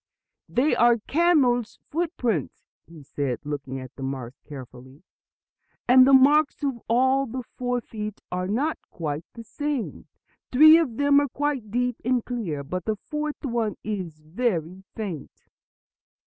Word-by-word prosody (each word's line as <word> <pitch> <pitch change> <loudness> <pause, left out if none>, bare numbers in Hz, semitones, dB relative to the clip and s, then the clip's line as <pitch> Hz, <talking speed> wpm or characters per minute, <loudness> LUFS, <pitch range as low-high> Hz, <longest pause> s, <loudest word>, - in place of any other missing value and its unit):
"They 270 +5 +2
are 240 +1 +5
a 235 - -2
camel's 265 -7 +2
footprints," 260 - -2 0.2
he 160 -2 -13
said, 135 -2 -3
looking 140 -2 -4
at 130 -1 -10
the - - -11
marks 135 -1 -5
carefully. 130 +1 -12 0.8
"And 255 +1 +7
the 275 - +5
marks 290 +3 +5
of 265 -5 -2
all 260 +3 +3
the 255 +2 -5
four 245 +1 -3
feet 215 -2 -6
are 180 0 -2
not 270 +10 -1
quite 155 -1 -4
the 230 - -9
same. 290 +1 -4 0.4
Three 310 +5 +8
of 255 -9 -2
them 285 0 +5
are 285 -1 0
quite 275 -5 -2
deep 245 +2 -1
and 245 0 +1
clear; 190 - -3
but 180 +5 -5
the 220 - 0
fourth 300 +7 -5
one 235 -4 -1
is 185 -7 -4
very 180 0 -2
faint." 190 -10 -7
235 Hz, 145 wpm, -25 LUFS, 165-270 Hz, 0.8 s, Three